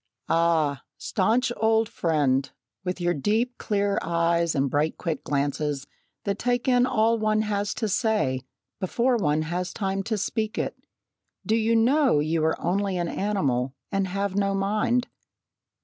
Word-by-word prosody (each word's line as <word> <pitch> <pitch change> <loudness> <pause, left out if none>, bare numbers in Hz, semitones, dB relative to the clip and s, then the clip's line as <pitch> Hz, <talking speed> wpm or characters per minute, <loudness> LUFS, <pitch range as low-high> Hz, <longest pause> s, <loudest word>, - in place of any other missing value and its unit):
"Ah! 160 -5 +2 0.2
staunch 230 +6 +1
old 225 0 +3
friend, 140 -7 +1 0.3
with 180 0 -3
your 175 0 +1
deep, 220 - 0
clear 200 -1 0
eyes, 170 0 +1
and 140 0 +2
bright 145 +4 0
quick 160 -5 -3
glances 145 0 -1 0.4
that 200 -1 -2
take 245 +1 0
in 250 -1 +4
all 225 -1 +2
one 215 0 +2
has 205 -1 -1
to 220 - -1
say, 210 - +1 0.4
before 235 +6 +1
one 155 -8 +1
has 175 +3 -3
time 195 -1 -2
to 220 +2 -2
speak 215 +2 -2
it, - - -2 0.7
do 220 - +2
you 225 0 +2
know 260 - +4
you 155 +2 0
are 160 0 +1
only 195 +1 0
an 175 -1 -1
animal 140 -11 -1 0.2
and 195 -1 0
have 195 +1 -2
no 200 -1 +1
mind? 215 +5 +1
195 Hz, 150 wpm, -25 LUFS, 160-220 Hz, 0.7 s, in